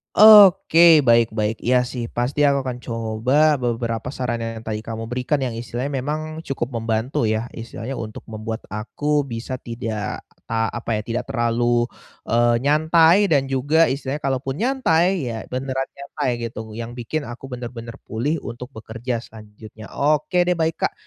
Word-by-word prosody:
Oke, 175 -7 +8
baik-baik, 115 -2 +2
iya 125 +1 +2
sih, 125 -1 -5
pasti 125 +5 -2
aku 140 -1 +2
akan 125 -1 -4
coba 125 +6 +1
beberapa 115 -1 -2
sarannya 120 -3 -2
yang 110 - -9
tadi 110 -1 -3
kamu 115 +1 -6
berikan 125 +4 0
yang 125 - -2
istilahnya 120 +4 -4
memang, 155 +3 -4
cukup 135 -5 -4
membantu 115 +1 -1
ya? 110 +2 -2
Istilahnya, 115 +3 -7
untuk 110 -1 -7
membuat 110 +1 -5
aku 140 +7 -1
bisa 125 +1 -5
tidak, 115 -3 -5 0.2
a 115 0 0
apa 115 -1 -3
ya 105 - -1
tidak 120 +2 -3
terlalu, 120 0 +1 0.5
eee, 120 +1 +4
nyantai 160 +6 +4
dan 145 -6 +3
juga 145 +5 +3
istilahnya 140 +1 -4
kalaupun 135 0 -1
nyantai, 185 - +1
ya, 110 - -6
beneran 130 +1 -2
nyantai, 140 0 -4 0.2
gitu, 110 0 -8
yang 115 +2 -7
bikin 140 +5 -4
aku 125 +2 -9
benar-benar 120 -1 -7
pulih 145 +9 -1
untuk 125 +1 -8
bekerja 115 +2 -5
selanjutnya, 110 -1 -13
oke 150 +4 +1
deh, 180 - +2
baik 160 -1 -1
Kak. - - 0
125 Hz, 155 wpm, -22 LUFS, 115-145 Hz, 0.5 s, Oke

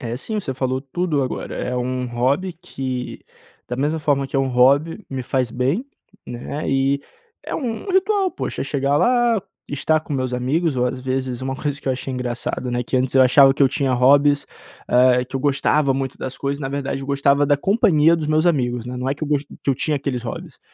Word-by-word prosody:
É 120 -3 -4
sim, 215 - -3
você 140 - -4
falou 130 0 -1
tudo 150 +1 -1
agora. 130 - -4
É 125 - -3
um 125 +1 -2
hobby 130 +10 0
que, 135 -7 -5 0.5
da 125 - -3
mesma 145 +4 0
forma 140 -3 +1
que - - -19
é - - +3
um 135 0 +1
hobby, 140 - +3
me 135 -1 -4
faz 130 -1 -1
bem, 135 - 0 0.4
né. 125 +5 -5
E 135 +1 +1 0.4
é - - -5
um 245 - -3
ritual 385 0 +2
poxa - - -5
é - - -3
chegar 140 0 0
lá, 240 +1 +3 0.3
estar 155 +2 +1
com 155 - -8
meus 130 -2 -1
amigos 140 +5 0
ou 125 0 +2
às 130 +1 -3
vezes 130 -1 -2
uma 135 0 -3
coisa 145 0 -3
que - - -5
eu - - +3
achei 130 +1 -5
engraçada, 125 0 -3
né, 120 0 -1
que 125 - -2
antes 130 0 0
eu 130 - +7
achava 135 +2 +6
que 140 - +1
eu 135 - +6
tinha 135 0 0
hobbies, 140 +3 +4 0.4
eh, 125 0 +4
que 130 - -16
eu - - -3
gostava 140 +1 +2
muito 135 -1 -3
das 130 0 -5
coisas, 140 +1 -2
na 135 - -3
verdade 135 0 -3
eu 135 - -7
gostava 140 +1 +3
da 145 0 +3
companhia 165 -2 +3
dos 155 -2 -3
meus 155 +2 +2
amigos, 125 -8 +1
né, 125 +1 -5
não 125 +1 -2
é 135 - 0
que 145 - -14
eu, - - -6
que - - 0
eu - - +3
gost 140 - -12 0.2
que - - +2
eu - - +2
tinha 150 +4 -1
aqueles 135 -3 -3
hobbies. - - -7
135 Hz, 230 wpm, -21 LUFS, 130-150 Hz, 0.5 s, eu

